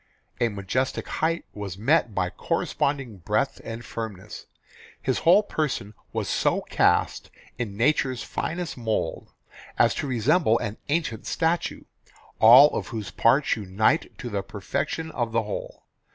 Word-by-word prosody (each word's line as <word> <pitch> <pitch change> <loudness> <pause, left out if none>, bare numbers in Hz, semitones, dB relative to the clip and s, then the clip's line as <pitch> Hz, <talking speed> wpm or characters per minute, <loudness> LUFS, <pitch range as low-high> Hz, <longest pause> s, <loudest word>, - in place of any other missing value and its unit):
A 120 - +2
majestic 110 +6 -2
height 165 +1 -1
was 100 -3 -6
met 120 0 +2
by 90 -1 0
corresponding 135 -7 -2
breadth 105 +9 -1
and 115 0 -7
firmness. 105 -4 -7 0.5
His 130 - -1
whole 185 +6 +5
person 150 - -2 0.2
was - - -2
so - - +1
cast - - +1 0.3
in 105 -5 -4
nature's 130 0 +1
finest 170 -1 -4
mould 110 -9 -3 0.5
as - - +4
to - - -3
resemble 125 - +3
an 105 -1 -4
ancient 145 -8 -1
statue, 165 0 -1 0.6
all 125 +6 +9
of - - -3
whose 110 -5 -5
parts 130 +6 +3
unite 110 - 0
to 125 - -6
the 100 -1 -1
perfection 140 +11 -4
of 120 -5 -2
the 115 0 +2
whole. 105 - -6
120 Hz, 140 wpm, -25 LUFS, 105-150 Hz, 0.6 s, all